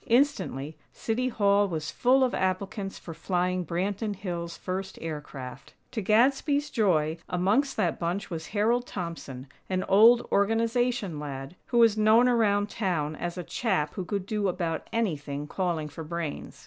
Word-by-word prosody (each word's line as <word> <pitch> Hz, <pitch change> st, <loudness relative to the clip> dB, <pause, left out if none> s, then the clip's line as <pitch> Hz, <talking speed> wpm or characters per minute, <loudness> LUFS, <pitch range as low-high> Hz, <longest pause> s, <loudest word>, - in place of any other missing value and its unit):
Instantly, 190 Hz, -, +1 dB, 0.2 s
City 240 Hz, +3 st, -1 dB
Hall 200 Hz, -3 st, +3 dB
was 160 Hz, -4 st, -3 dB
full 260 Hz, +2 st, +3 dB
of 255 Hz, -, +1 dB
applicants 195 Hz, +1 st, -2 dB
for 165 Hz, -, -8 dB
flying 180 Hz, +1 st, -1 dB
Branton 200 Hz, +5 st, -2 dB
Hills' 170 Hz, -3 st, -5 dB
first 190 Hz, +1 st, -4 dB
aircraft. 145 Hz, -5 st, -7 dB, 0.2 s
To 225 Hz, -, -2 dB
Gadsby's 275 Hz, +7 st, +2 dB
joy, 165 Hz, -8 st, +2 dB
amongst 210 Hz, +10 st, +1 dB
that 180 Hz, -6 st, 0 dB
bunch 180 Hz, +4 st, -2 dB
was 160 Hz, -1 st, -5 dB
Harold 230 Hz, +4 st, +1 dB
Thompson, 165 Hz, -8 st, -6 dB, 0.2 s
an 185 Hz, -1 st, 0 dB
old 230 Hz, +5 st, +6 dB
Organization 225 Hz, -3 st, +1 dB
lad, 140 Hz, +1 st, -6 dB
who 240 Hz, -, 0 dB
was 225 Hz, -2 st, +5 dB
known 220 Hz, +3 st, +6 dB
around 205 Hz, -4 st, +3 dB
town 160 Hz, -7 st, -1 dB
as 175 Hz, +3 st, -4 dB
a 180 Hz, -, -3 dB
chap 185 Hz, -8 st, -1 dB
who 190 Hz, -, -4 dB
could 195 Hz, +1 st, -3 dB
do 210 Hz, -1 st, -1 dB
about 170 Hz, -3 st, -2 dB
anything 150 Hz, -10 st, -2 dB
calling 170 Hz, -2 st, -2 dB
for 150 Hz, +2 st, -8 dB
brains. 165 Hz, -1 st, -5 dB
190 Hz, 150 wpm, -27 LUFS, 165-225 Hz, 0.2 s, old